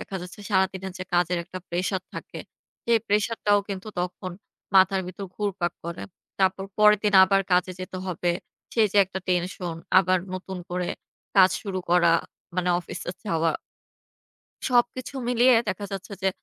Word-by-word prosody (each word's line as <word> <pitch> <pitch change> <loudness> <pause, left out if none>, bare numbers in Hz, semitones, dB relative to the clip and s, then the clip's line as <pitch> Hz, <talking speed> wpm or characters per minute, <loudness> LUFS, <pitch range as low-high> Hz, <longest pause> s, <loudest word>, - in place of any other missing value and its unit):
দেখা 195 - -5
যাচ্ছে, 180 +3 -10
সারাদিনের 190 -1 +1
যে 185 - -4
কাজের 175 0 +2
একটা 185 - -7
প্রেশার 185 +2 -1
থাকে, - - -7 0.5
সেই 235 -1 +4
প্রেশার 210 +3 +1
টাও 205 0 +5
কিন্তু 195 +1 -5
তখন 180 +1 -4 0.4
মাথার 190 0 +5
ভেতর 185 +2 -6
ঘুরপাক 190 -4 -1
করে। 170 0 -5 0.4
তারপর 190 0 +2
পরের 210 -1 +7
দিন 210 -1 +2
আবার 195 +1 +3
কাজে 180 +1 +3
যেতে 185 0 -6
হবে। 175 -1 -1 0.4
সেই 225 -2 +5
যে - - -1
একটা 190 0 -5
টেনশন, 180 -1 -1 0.2
আবার 185 0 +3 0.2
নতুন 185 0 -6
করে 180 0 -2 0.5
কাজ 190 -1 +8
শুরু 195 -3 -3
করা 175 -1 +5 0.5
মানে 180 0 +1
অফিসে 175 - -6
যাওয়া 165 -5 +1 1.2
সবকিছু 245 +2 +1
মিলিয়ে 245 +1 +5
দেখা 205 +1 -2
যাচ্ছে, 195 +1 -6
যে 190 - +3
190 Hz, 155 wpm, -25 LUFS, 180-205 Hz, 1.2 s, কাজ